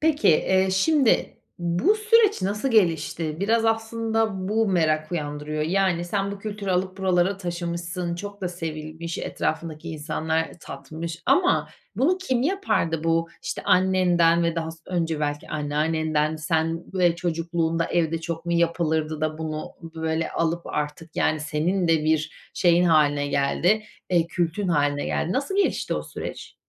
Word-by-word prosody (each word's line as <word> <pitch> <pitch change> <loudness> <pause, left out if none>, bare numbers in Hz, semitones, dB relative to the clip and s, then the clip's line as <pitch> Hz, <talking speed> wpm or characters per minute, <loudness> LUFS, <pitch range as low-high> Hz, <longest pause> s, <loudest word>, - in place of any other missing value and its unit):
Peki, 310 -1 +3
eee, 190 +4 +3
şimdi 265 +7 +2 0.2
bu 175 - +2
süreç 435 - +3
nasıl 210 +7 -1
gelişti? 165 -6 +1
Biraz 225 +3 +2
aslında 225 -3 0
bu 220 0 +2
merak 155 -3 +1
uyandırıyor. 150 -1 -3
Yani, 175 0 +1
sen 200 +2 -1
bu 200 - -7
kültürü 205 -1 -4
alıp 185 +1 -1
buralara 185 0 +2
taşımışsın, 175 -1 -3
çok 200 +3 -7
da 185 - -1
sevilmiş, 160 -1 -5
etrafındaki 160 0 -3
insanlar 160 +1 -1
tatmış 160 +5 -7
ama 365 0 +3 0.3
bunu 360 +8 +2
kim 260 -10 0
yapardı? 265 - 0
Bu 165 0 +1
işte - - -4
annenden 180 -2 +3
ve 170 -1 +1
daha 165 -1 -2
s 165 - -12
önce 165 -4 -1
belki 145 0 -2
anneannenden 155 +1 0
sen 160 +2 -1
ve 175 -2 +3
çocukluğunda 165 -1 -1
evde 165 -1 0
çok 165 0 -5
mu 170 - 0
yapılırdı 160 -2 0
da 155 0 -1
bunu 155 -1 -4
böyle 160 0 -2
alıp 170 +1 -1
artık, 150 +2 -4
yani, 155 -1 +1
senin 165 +4 0
de 160 -2 +3
bir 155 0 -1
şeyin 175 -1 +4
hâline 145 -4 +3
geldi, 165 +9 +2 0.3
eee, 170 -2 +3
kültün 175 +2 -1
hâline 145 -3 +1
geldi. 175 - -1
Nasıl 280 - -1
gelişti 400 - +1
o - - -2
süreç? - - -7
170 Hz, 145 wpm, -24 LUFS, 160-190 Hz, 0.3 s, şeyin